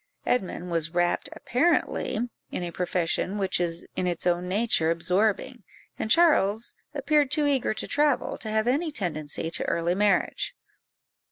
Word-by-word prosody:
Edmund 180 -6 -1
was 165 0 -1
wrapt 175 0 +1
apparently 260 -2 0 0.3
in - - -4
a 175 - -4
profession 180 +2 -1
which 195 -3 0
is 170 -1 -1
in 180 - -1
its 175 -2 -2
own 175 0 +1
nature 200 -5 +2
absorbing, 185 +5 +1 0.4
and 220 - -2
Charles 230 - +3 0.2
appeared 290 0 +2
too 300 +2 +1
eager 270 -6 +1
to - - -4
travel 295 -3 +1
to 220 - -6
have 220 +1 0
any 295 +7 +1
tendency 165 - -3
to - - -1
early 170 +1 0
marriage. 200 -1 +1
195 Hz, 150 wpm, -26 LUFS, 175-250 Hz, 0.4 s, Charles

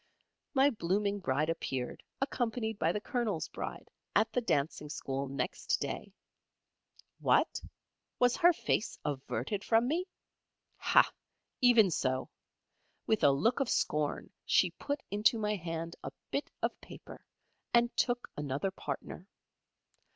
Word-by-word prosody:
My 275 +2 +5
blooming 200 0 0
Bride 155 -1 +1
appeared, 130 -6 -3 0.2
accompanied 230 -5 -1
by 160 +1 +3
the 210 - -1
Colonel's 220 - -1
Bride, - - -6 0.2
at 220 - +3
the 250 - +2
Dancing 150 -6 0
School 135 -1 -3
next 140 +1 -1
day. - - -4 1.1
What? - - +2 0.6
Was 245 0 +4
her 350 +1 +7
face 270 -8 -1
averted 140 - -2
from 230 +1 +3
me? 335 +6 0 0.7
Hah! - - +5 0.5
Even 235 -6 +6
so. 130 -3 -1 0.7
With 220 - +1
a - - +8
look 185 - +2
of 275 - 0
scorn 150 -1 0
she - - +3
put 285 0 -4
into 210 +4 +3
my 210 -1 0
hand 165 -2 -4
a - - -3 0.2
bit - - -1
of - - -1
paper, - - -11 0.5
and 235 0 +3
took 245 -1 +1
another 145 +6 -2
partner. 190 -1 -6
205 Hz, 130 wpm, -32 LUFS, 150-240 Hz, 1.1 s, a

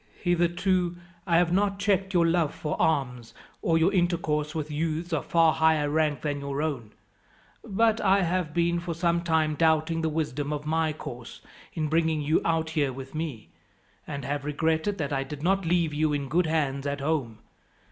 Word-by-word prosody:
"Hitherto 175 0 +1 0.3
I 170 -2 +4
have 175 0 +2
not 195 +1 +1
checked 195 -1 +1
your 170 -1 +5
love 165 -2 +1
for 150 - -3
arms, 125 -7 -1 0.3
or 165 -1 +2
your 170 +5 +3
intercourse 165 -4 0
with 155 -1 -3
youths 160 +3 -2
of 150 - -2
far 165 -2 +4
higher 160 -2 +2
rank 155 -1 +1
than 145 -2 -2
your 140 +1 -3
own; 125 -9 -4 0.7
but 225 +3 +1
I 195 0 +3
have 175 -2 -1
been 170 +1 +1
for 170 -1 -4
some 170 0 +1
time 160 -2 +1
doubting 160 +1 +2
the 160 - 0
wisdom 150 -2 -2
of 150 0 -4
my 160 0 +1
course 120 -5 -9 0.3
in 155 -2 -1
bringing 160 0 +1
you 150 +2 +1
out 160 -1 0
here 145 -4 +1
with 130 +1 -9
me, 155 -8 -5 0.6
and 140 -3 -5
have 145 +1 -2
regretted 160 +6 0
that 145 -3 -2
I 135 0 0
did 145 +1 -8
not 190 0 +1
leave 170 -2 +1
you 150 0 +1
in 140 -2 -2
good 170 +3 +2
hands 145 -3 -1
at 140 0 -2
home. 140 -7 -1
160 Hz, 185 wpm, -27 LUFS, 145-170 Hz, 0.7 s, your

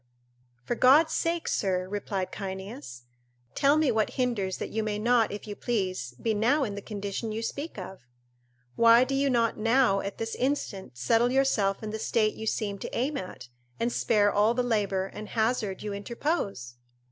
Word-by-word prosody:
"For - - -2
God 280 +7 +5
sake, 335 0 -1
sir," 185 -2 0
replied 195 -1 -3
Cyneas, 190 - -7 0.5
"tell 285 +2 +3
me 310 -4 +3
what 220 -2 0
hinders 225 -8 -1
that - - -5
you 220 - -1
may 215 -1 -2
not, 230 +1 +3
if 205 - -6
you 205 -1 -6
please, 185 - -2
be 225 - 0
now 245 +8 +2
in 210 -6 -2
the 200 - -6
condition 205 +1 -4
you 220 +1 -3
speak 285 +6 -5
of? 190 0 -7 0.8
Why 230 +1 +7
do 265 +1 -2
you 275 +1 +2
not 230 -3 +1
now 225 -3 +3
at 200 0 -5
this 225 0 -4
instant 235 - -2
settle 230 - +2
yourself 225 -7 +1
in 215 - -4
the 220 - -4
state 215 -1 +1
you 220 - -7
seem 205 -2 -2
to - - -5
aim 270 +5 0
at, 155 - -7 0.3
and 235 +1 0
spare 205 -2 +2
all 215 +3 +3
the 250 - +1
labour 200 -5 0
and 210 +2 -8
hazard 220 -4 -1
you 210 -1 -3
interpose?" 200 - -3
215 Hz, 180 wpm, -28 LUFS, 195-245 Hz, 0.8 s, Why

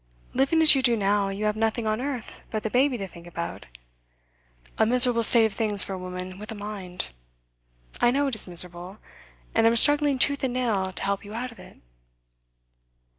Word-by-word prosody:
Living 275 +5 +2
as 310 - +9
you 270 - +1
do 240 -3 +2
now, 200 -1 0
you 200 +2 -4
have 210 0 0
nothing 225 +1 -2
on 215 +2 -2
earth 260 -4 -6
but 215 -1 -4
the 220 - -4
baby 260 0 +1
to 195 -3 -6
think 170 -1 -14
about 170 -1 -7 1.1
a - - +4
miserable 245 +1 +4
state 230 0 +4
of 220 - -2
things 210 -1 +5
for 195 - -6
a - - -5
woman 185 +1 -8
with 210 +1 -8
a - - -6
mind. 200 - -6 0.9
I 240 - +4
know 280 +3 0
it 270 - -2
is 220 - +3
miserable, 180 +2 +1 0.6
and 225 0 +3
I'm 230 - +2
struggling 290 +2 +3
tooth 280 +2 +2
and 255 -2 -2
nail 210 -7 -1
to 185 - -6
help 200 +1 -2
you 210 +1 -10
out 250 +2 -5
of 230 - -17
it. - - -15
220 Hz, 200 wpm, -24 LUFS, 195-250 Hz, 1.1 s, as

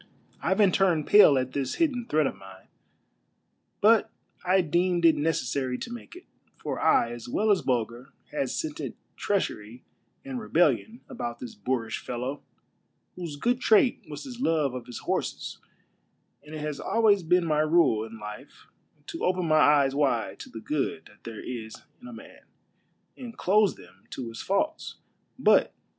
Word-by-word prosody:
Ivan 190 +3 +3
turned 175 -5 +2
pale 205 -9 +7
at 130 0 -1
this 135 -3 -2
hidden 255 -8 0
threat 155 0 +2
of - - -2
mine; 95 -1 -14 1.2
but 220 +1 +4 0.3
I 185 +1 +3
deemed 175 +1 +1
it 165 - +6
necessary 135 -4 -1
to 240 - -7
make 240 +7 -10
it, 360 - -13 0.3
for - - -4
I 115 - +3
as 120 0 -8
well 215 - +1
as 195 - +3
Bulger 120 0 -2 0.2
had 290 -2 -2
scented 320 -1 -4 0.2
treachery 120 - -3 0.4
and 265 -2 -4
rebellion 220 +4 +1
about 120 - -5
this 120 -2 -8
boorish 115 +1 -3
fellow, 125 +4 -5 0.7
whose 170 -5 -6
good 240 - 0
trait 230 +2 +4
was 145 - -7
his 250 -3 -9
love 155 - +1
of 125 -2 -7
his 120 - -7
horses, - - -3 0.8
and 150 +1 -10
it 155 - -5
has 150 -2 -4
always 215 -3 +3
been 175 +1 +2
my 155 -2 +1
rule 155 -8 +3
in 115 0 -9
life 105 0 -10 0.4
to - - -7
open 180 -2 0
ni}'' - - +3
eyes 145 -3 +5
wide 120 -9 0
to - - -9
the 110 - -9
good 150 +2 -2
that 105 - -24
there 115 -2 -7
is 115 -3 -6 0.3
in 245 - -11
a 255 - -9
man, - - -13 0.7
and 240 -3 -10
close 205 +1 +3
them 95 +2 -18
to 125 -3 -6
his 115 - -8
faults. 305 +12 -1
155 Hz, 160 wpm, -27 LUFS, 125-205 Hz, 1.2 s, pale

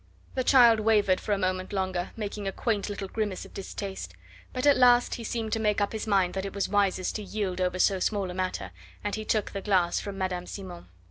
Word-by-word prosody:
The 260 - 0
child 240 -4 +6
wavered 210 -4 +3
for - - -4
a 205 - +3
moment 185 0 -1
longer, 185 -2 -1
making 205 -2 -4
a - - 0
quaint 210 -1 -1
little 200 -1 -4
grimace 205 -2 -3
of - - -15
distaste. 190 - -6 0.4
But 255 +2 -2
at 285 -1 +7
last 245 -1 +5
he 235 - -5
seemed 225 -1 -3
to 225 - +1
make 210 -2 +1
up 205 +1 0
his 220 0 -4
mind 195 -4 +2
that 190 - -2
it 195 0 -6
was 200 - 0
wisest 200 -2 +1
to - - -6
yield 195 -3 -3
over 180 0 0
so 190 +1 +3
small 195 -1 -1
a - - -6
matter, 185 - -3 0.3
and 205 -1 -2
he 215 - -2
took 215 -2 0
the 195 - -4
glass 185 -4 +2
from 200 -1 -6
Madame 180 -2 -2
Simon. 185 - -8
200 Hz, 230 wpm, -28 LUFS, 185-215 Hz, 0.4 s, at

